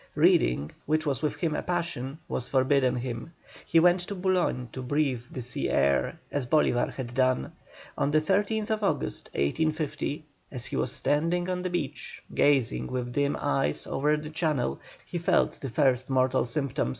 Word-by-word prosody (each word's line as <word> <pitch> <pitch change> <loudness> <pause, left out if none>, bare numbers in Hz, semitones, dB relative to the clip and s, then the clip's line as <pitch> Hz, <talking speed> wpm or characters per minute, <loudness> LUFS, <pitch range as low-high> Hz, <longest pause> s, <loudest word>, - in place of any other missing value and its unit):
Reading, 60 +5 +3 0.2
which 155 +1 +1
was 140 -3 -1
with 150 - 0
him 165 -4 -1
a - - -1
passion, 170 -6 -3
was 125 - -3
forbidden 130 -1 +3
him. 125 +5 -5 0.3
He 165 - +5
went 175 +2 +5
to 200 - -4
Boulogne 180 -9 0
to 130 - -5
breathe 135 -1 0
the 130 - -6
sea 125 - -2
air, 70 0 +2
as 140 -3 -2
Bolívar 125 -4 +2
had 120 -3 -6
done. 130 0 +1 0.5
On - - +2
the 155 +1 +4
13th 205 +6 0
August, 65 - -1
1850, 155 - -1 0.3
as 125 -3 -4
he - - -3
was 125 - 0
standing 170 +6 +1
on 180 0 -1
the 185 - -2
beach, 150 -5 -4
gazing 140 -4 +2
with 125 -1 -3
dim 140 +2 +1
eyes 140 -1 0
over 150 +2 +1
the 150 +1 -7
Channel, 155 -5 0 0.3
he 175 - -4
felt 170 - +2
the 135 - -4
first 130 -1 +2
mortal 130 -1 +2
symptom. 140 - -1
145 Hz, 170 wpm, -28 LUFS, 125-160 Hz, 0.5 s, He